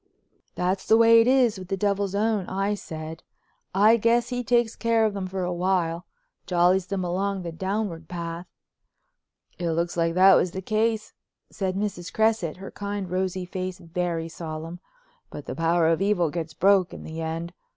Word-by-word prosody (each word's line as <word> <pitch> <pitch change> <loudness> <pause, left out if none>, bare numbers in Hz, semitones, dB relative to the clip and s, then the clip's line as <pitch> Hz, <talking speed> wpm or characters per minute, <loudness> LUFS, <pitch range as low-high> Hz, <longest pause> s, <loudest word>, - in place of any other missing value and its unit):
"That's 185 +2 -1
the 220 - +6
way 230 0 +7
it 225 - +2
is 250 -6 +3
with 185 - -9
the 195 - -2
Devil's 200 0 0
own," 210 -2 0
I 195 +2 -1
said. 160 -4 -7 0.5
"I 215 +4 +6
guess 235 +2 +2
he 245 -1 -2
takes 235 -1 +2
care 230 -1 +2
of 215 - 0
them 195 -2 -4
for 190 0 -3
a 180 0 -1
while; 175 -1 0 0.4
jollies 180 +1 +3
them 195 -1 -2
along 190 +2 -1
the 170 - -5
downward 190 -2 -3
path." 170 0 -6 1.1
"It 170 -2 -1
looks 170 +1 -1
like 165 -1 0
that 190 +1 +7
was 180 -1 +2
the 190 - -4
case," 220 +1 0 0.4
said 190 -2 -2
Mrs. 195 -3 -3
Cresset, 220 -8 +1
her 195 +1 -9
kind, 200 -2 -5
rosy 185 0 -1
face 185 0 -5
very 170 -2 -3
solemn. 165 +1 -7 0.5
"But 145 - -9
the - - -5
power 165 +3 +2
of 165 +2 +2
evil 190 -6 +2
gets 160 -2 -5
broke 195 0 +3
in - - -9
the 160 +1 -6
end. 165 +2 -4
185 Hz, 180 wpm, -25 LUFS, 170-205 Hz, 1.1 s, way